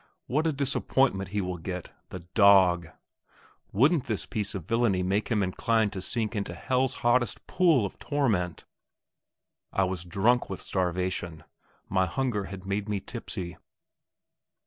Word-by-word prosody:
What 150 +5 0
a - - +2
disappointment 135 -7 +1
he 105 +1 -1
will 90 -2 -4
get, 90 +1 -5 0.2
the 90 - -7
dog! 95 -5 +5 0.8
Wouldn't 140 - +3
this 110 -6 -2
piece 105 -1 -3
of 90 -5 -5
villainy 115 -4 +1
make 100 +3 0
him 110 -4 +1
inclined 105 +3 +1
to 95 - -4
sink 115 +3 -1
into 100 -1 -3
hell's 130 0 0
hottest 120 -2 +2
pool 165 - +3
of 100 - -7
torment! 110 - -1 1.1
I 95 - +2
was 95 -2 -2
drunk 100 +7 +2
with 95 - -4
starvation; 90 -2 -2 0.4
my 95 -1 +1
hunger 105 0 -1
had 95 0 -9
made 100 +2 -2
me 105 -1 0
tipsy. 95 -6 -6
100 Hz, 145 wpm, -28 LUFS, 95-120 Hz, 1.1 s, dog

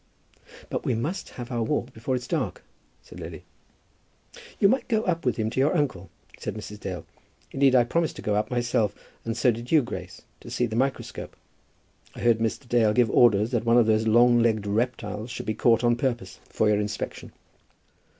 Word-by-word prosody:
"But - - -2
we 125 - 0
must 150 - -3
have 120 0 -8
our 120 -1 -1
walk 120 +3 -1
before 115 +4 -2
it 125 - -3
is - - -9
dark," - - -2 0.4
said - - -12
Lily. - - -8 1.2
"You 200 - +6
might 255 +6 +1
go 220 -2 +1
up 170 -5 -1
with 125 - +2
him 110 -1 -1
to 130 - -2
your 150 +6 +3
uncle," 95 - -2 0.3
said - - -4
Mrs. 105 -1 -8
Dale. 90 -5 -6 0.5
"Indeed, 135 -1 +3
I 125 - +6
promised 165 +6 -1
to - - -9
go 105 - 0
up 105 +1 0
myself, 120 -4 0 0.3
and 115 0 -3
so 120 +1 +4
did 120 +2 -7
you, 155 -4 +5
Grace, - - -7 0.2
to - - -11
see 125 - 0
the 110 -2 -4
microscope. 135 +3 -2 0.8
I - - -8
heard 120 -2 +3
Mr. 115 +3 -2
Dale 115 -3 +3
give 120 -1 +3
orders 110 -1 +4
that 120 -3 0
one 115 +1 +4
of 120 - +5
those 110 0 +2
long 120 +2 +5
legged 110 -3 +2
reptiles 105 0 -2
should - - -6
be 110 - -1
caught 115 +2 +3
on 120 0 +4
purpose 120 -7 -3
for 110 - +1
your 105 -1 +3
inspection." 105 0 -4
120 Hz, 200 wpm, -26 LUFS, 110-125 Hz, 1.2 s, You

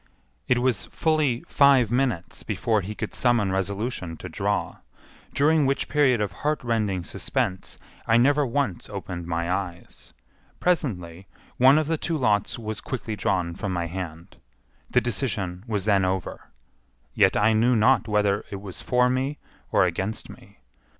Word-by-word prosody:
It 125 - +3
was 120 -5 0
fully 155 -7 0
five 135 -6 +4
minutes 120 -9 -1
before 110 +1 0
he 105 +3 -6
could - - -5
summon 120 -6 +2
resolution 95 -2 -3
to - - -8
draw, - - -2 0.5
during 150 0 +3
which 140 +1 0
period 140 -5 +3
of 105 -2 -1
heartrending 115 - -1
suspense 95 +3 -3 0.3
I 115 - +5
never 145 +4 +4
once 135 -8 -2
opened 90 -4 -6
my 85 +1 -1
eyes. 90 -2 -5 0.5
Presently 95 - -1 0.3
one 135 +3 +6
of 155 - +2
the 160 +2 0
two 165 -2 -1
lots 105 -7 +1
was 110 -2 -5
quickly 110 -4 -4
drawn 90 -3 -1
from 95 +2 -4
my 85 -1 -1
hand. 85 0 -7 0.5
The - - +3
decision 105 -7 -2
was 105 -4 -2
then 100 -3 +3
over, 95 -1 -3 0.6
yet - - +3
I 105 +2 +4
knew 120 +3 +3
not 115 +4 +3
whether 105 -1 +1
it 100 - -6
was 95 -2 -8
for 125 0 +2
me 130 +3 -1 0.3
or - - +4
against 100 +4 -3
me. - - -17
110 Hz, 150 wpm, -25 LUFS, 95-130 Hz, 0.6 s, one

